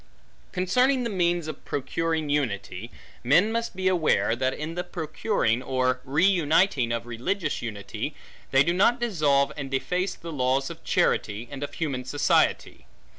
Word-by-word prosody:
Concerning 250 +9 +2
the 235 - -2
means 175 -3 +1
of 155 - -7
procuring 160 +3 -2
unity; 115 -7 -2 0.3
men 170 - +4
must 230 -2 -2
beware, 180 -10 +2
that 130 +2 0
in 155 +4 -5
the 180 +1 -3
procuring, 160 - -1
or 130 -1 0
reuniting, 160 -3 +2
of 115 0 -2
religious 155 - -2
unity, 110 +5 -5 0.3
they 135 +1 +5
do 170 - +1
not 230 +7 +3
dissolve 150 -12 +2
and 140 -2 -5
deface 180 +8 -1
the 170 - -8
laws 135 -1 0
of - - -11
charity, 105 +4 0
and 140 -1 -7
of 145 - -5
human 140 -7 -2
society. 145 +3 +1
150 Hz, 145 wpm, -26 LUFS, 130-180 Hz, 0.3 s, they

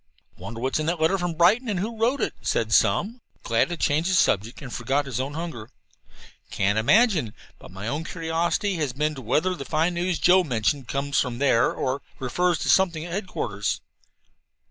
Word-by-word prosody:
"Wonder 115 0 -8
what's 130 +5 -1
in 155 - -2
that 170 0 0
letter 165 +5 +2
from 175 -2 -2
Brighton, 205 +9 +3
and 195 -4 -1
who 220 +5 -3
wrote 245 +5 +1
it?" - - -1
said - - 0
Sum, 230 +5 +2 0.2
glad 115 +8 +1
to 175 - -4
change 155 +3 +1
the 190 - +2
subject 110 - +1
and 130 -5 -9
forget 135 +4 0
his 130 -2 -4
own 135 +3 -3
hunger. 160 -10 -6 0.8
"Can't 100 +2 +1
imagine, 180 - +3 0.2
but - - -13
my 95 +4 -7
own 145 +6 -2
curiosity 170 +4 -1
has 145 -5 -2
been 150 +3 0
as 150 - -10
to - - -6
whether 155 +10 +1
the 160 - -6
fine 160 +5 0
news 175 0 -1
Joe 185 +1 +5
mentioned 125 0 -1
comes 140 +1 -1
from 125 -3 -1
there 130 -3 +3
or 130 +2 -2 0.2
refers 175 +7 0
to - - -3
something 170 -4 +3
at 175 - -7
headquarters." 105 - -3
155 Hz, 195 wpm, -24 LUFS, 125-180 Hz, 0.8 s, Joe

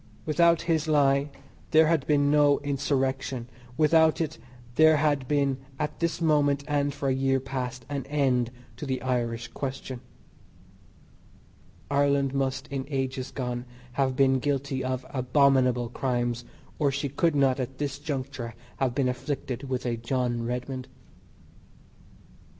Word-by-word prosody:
Without 170 +1 +3
his 160 -2 +1
lie 140 -1 +3 0.4
there 160 0 +6
had 160 -3 +1
been 145 -1 +3
no 145 -1 +5
Insurrection; 135 -3 -1 0.3
without 160 0 +4
it 160 -2 -2 0.3
there 155 +3 +6
had 145 -3 +1
been 140 -2 +1 0.2
at 150 +1 -3
this 170 -1 0
moment, 145 -3 +2
and 145 -1 +1
for 140 0 -4
a 135 - +3
year 135 0 +2
past, 130 -1 -5
an 140 -2 -4
end 130 -5 +1 0.3
to 150 - -6
the 130 -1 -1
"Irish 120 -2 -1
question." 130 -1 -5 1.9
Ireland 140 -1 +2
must 135 -1 -1
in 135 -1 -3
ages 135 -2 -2
gone 125 -2 -4 0.3
have 130 0 0
been 135 0 +4
guilty 135 -1 -1
of 130 0 -2
abominable 130 -2 +3
crimes 120 -1 -1 0.3
or 145 -3 +3
she 140 +1 -2
could 150 +3 +1
not 135 -2 +3
at 130 +1 -4
this 140 -1 -3
juncture 130 -5 -4 0.2
have 130 -3 0
been 135 -2 +2
afflicted 130 0 -3
with 130 -1 -2
a 120 -1 -1
John 120 0 -1
Redmond. 125 +1 -4
135 Hz, 140 wpm, -27 LUFS, 130-145 Hz, 1.9 s, there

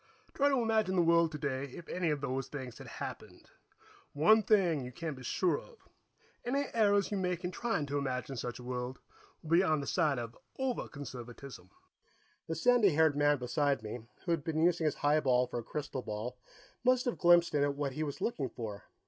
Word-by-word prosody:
Try 285 0 +3
to 275 - +2
imagine 220 -5 +1
the 175 - +4
world 170 -1 +4
today 140 -3 -2
if 150 +5 -10
any 180 -2 -1
of 150 -2 -1
those 135 -1 -2
things 130 -5 -7
had - - -10
happened. - - -8 0.6
One 170 +10 +5
thing 185 -9 +3
you 125 - -7
can 160 +4 -4
be 130 - -11
sure 160 +6 +1
of 475 - -16 0.7
any 275 +4 0
errors 205 -3 +3
you 205 - 0
make 180 -2 -1
in 180 - -2
trying 200 -6 -1
to 145 0 -1
imagine 135 0 -3
such 120 0 -4
a 125 - -10
world 125 +1 -4 0.5
will 160 - -8
be 170 +2 +6
on 155 -5 +2
the 140 - -4
side 155 -5 +1
of 115 -1 -5 0.2
over 265 -2 -1
conservatism." 130 -2 -9 0.8
The - - -2
sandy 245 -5 +5
haired 160 -2 +4
man 145 0 +3
beside 140 0 0
me, 110 +3 -5 0.3
who 175 - 0
had 165 -4 0
been 160 0 0
using 170 -1 +3
his 150 - +1
highball 140 -4 +3
for 120 -1 -4
a - - -6
crystal 145 +1 -4
ball, 110 +3 -5 0.5
must 255 0 +3
have 245 - -2
glimpsed 175 -1 +5
in 145 -1 +3
it 145 0 0
what 140 -1 -2
he 155 - -4
was 145 -3 -3
looking 145 - -1
for. 105 -4 -7
150 Hz, 205 wpm, -32 LUFS, 130-180 Hz, 0.8 s, be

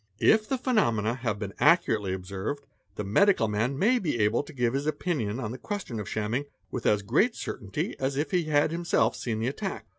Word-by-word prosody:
If 215 - +4
the 265 - +1
phenomena 120 - +1
have 115 -4 -2
been 100 -2 -5
accurately 120 - +3
observed, 95 +9 -4 0.3
the 105 - -3
medical 115 - +3
man 115 +6 -1
may 240 - +3
be 160 - -1
able 105 +3 +3
to 145 - -11
give 120 -4 0
his 140 +2 -1
opinion 145 - -1
on 110 -4 -3
the 125 - -7
question 190 - -4
of 105 - -5
shamming 110 +6 -1 0.3
with 125 - -2
as 105 -1 +3
great 180 - +2
certainty 100 -5 -4
as 135 +1 -1
if 150 +6 -1
he 180 -3 +1
had 150 0 +2
himself 170 +1 +1
seen 115 -3 -3
the 115 - -1
attack. 190 +9 -4
130 Hz, 205 wpm, -27 LUFS, 105-170 Hz, 0.3 s, If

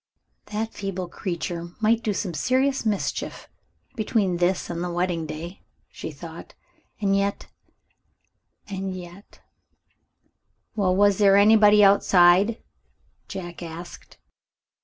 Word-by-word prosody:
"That 215 +2 -4
feeble 195 -2 -4
little 175 - -11
creature 170 -2 -4
might 225 +1 +2
do 220 - -1
some 190 -3 -3
serious 260 - +1
mischief, 205 -3 -3 0.5
between 210 -5 0
this 180 +1 0
and 170 0 -4
the 180 - -3
wedding 175 -2 -1
day," 160 +4 -7 0.3
she - - -7
thought; - - -11 0.4
"and 195 -2 +1
yet 200 0 -1 1.2
and 195 -1 -4
yet 180 +2 -12 0.6
" - - -48
"Well, 190 -4 +1
was 205 0 +3
there 200 -1 +6
anybody 210 0 +6
outside?" 195 +1 +4 0.6
Jack 175 -3 -7
asked. 170 +1 -10
195 Hz, 115 wpm, -24 LUFS, 175-210 Hz, 1.2 s, there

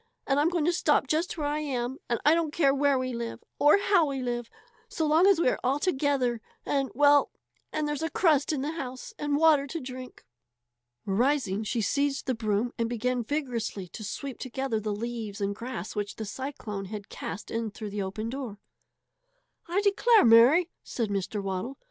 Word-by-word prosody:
And 275 0 +2
I'm 300 +3 +3
going 340 -4 0
to 345 - +3
stop 300 -5 +2
just 320 +6 -1
where 300 - -2
I 295 +1 0
am. 260 -3 -3 0.3
I 300 - +7
don't 330 -2 +1
care 280 -4 +3
where 280 0 +3
we 255 0 -2
live 235 -1 -5 0.2
or 295 +6 +6
how 390 -5 +3
we 275 -1 -3
live 240 -2 -3 0.4
so 320 - -1
long 315 +5 +5
as 395 -4 +5
we 340 - +3
are - - +1
all 260 +3 +2
together 275 -7 0 0.2
and 275 -2 0
well 290 +1 +5 0.4
and 305 -1 -1
there's 295 0 -2
a 325 - -1
crust 310 -6 +2
in 290 -4 -1
the 295 - -2
house 260 -6 -6
and 290 -1 0
water 300 -3 +4
to 330 +4 -4
drink." 255 -1 -9 0.8
Rising, 220 -1 +1
she 230 +2 -1
seized 280 +5 0
the 260 - 0
broom 220 0 -1
and 230 0 0
began 245 +1 -1
vigorously 235 -8 -3
to 215 - -8
sweep 260 +6 -5
together 260 -2 -2
the 215 0 -3
leaves 220 -1 -4
and 200 0 -1
grass 245 +3 -6
which 205 -1 -3
the 220 - -5
cyclone 210 -4 -5
had 200 0 -7
cast 210 - -6
in 230 -1 -2
through 210 0 -7
the 205 0 -3
open 195 +3 -4
door. 255 -6 -5 1.1
"I 360 +4 +1
declare, 430 - +5
Mary!" 250 +10 +6
said 230 -4 -3
Mr. 200 +1 -2
Waddle. 195 +8 -3
260 Hz, 190 wpm, -28 LUFS, 225-295 Hz, 1.1 s, I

